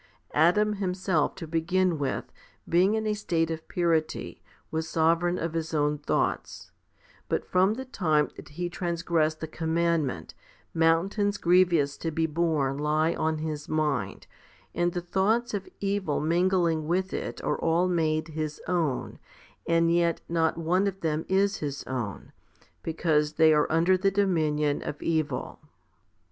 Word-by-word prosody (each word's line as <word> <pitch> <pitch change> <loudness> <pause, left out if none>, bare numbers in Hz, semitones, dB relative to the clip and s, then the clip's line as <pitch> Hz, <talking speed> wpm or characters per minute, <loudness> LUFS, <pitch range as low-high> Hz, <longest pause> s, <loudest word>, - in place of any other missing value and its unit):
Adam 210 +7 +3
himself 185 -4 0
to 170 - -7
begin 165 +1 0
with, 135 -2 -3 0.4
being 185 +5 +3
in 220 0 -1
a 215 - +1
state 165 -6 -1
of 160 0 -6
purity, 165 -3 -1 0.3
was 160 0 -2
sovereign 170 +2 +2
of 165 0 -3
his 160 -1 -3
own 150 0 +1
thoughts; 145 - -2 0.6
but - - -1
from 190 +4 +2
the 260 +2 -6
time 155 - +1
that - - -11
he 175 +4 -4
transgressed 170 -3 -1
the 160 - -3
commandment, 160 - -1 0.4
mountains 190 +6 +2
grievous 170 -5 +3
to 165 - -3
be 160 +1 0
borne 150 -4 0
lie 155 +2 +1
on 160 -1 -1
his 155 -1 -5
mind, 145 -10 -1 0.5
and 175 0 0
the 175 - -2
thoughts 215 +7 0
of 195 -2 -4
evil 195 -6 -1
mingling 170 -1 +1
with 185 +3 0
it - - -4
are - - -1
all 170 +2 +2
made 160 -2 0
his 155 -1 -4
own, 165 -6 -1 0.5
and 165 0 +3
yet 170 -1 +2
not 165 -1 +1
one 180 +4 +1
of 195 -1 -4
them 160 -1 -1
is 195 +1 +2
his 140 -2 -4
own, 120 -6 -5 0.5
because 155 -2 0
they 160 0 +5
are 150 -1 +2
under 170 +4 +4
the 190 +2 +2
dominion 155 -7 +1
of 150 - -5
evil. 155 -5 -2
165 Hz, 150 wpm, -27 LUFS, 155-180 Hz, 0.6 s, they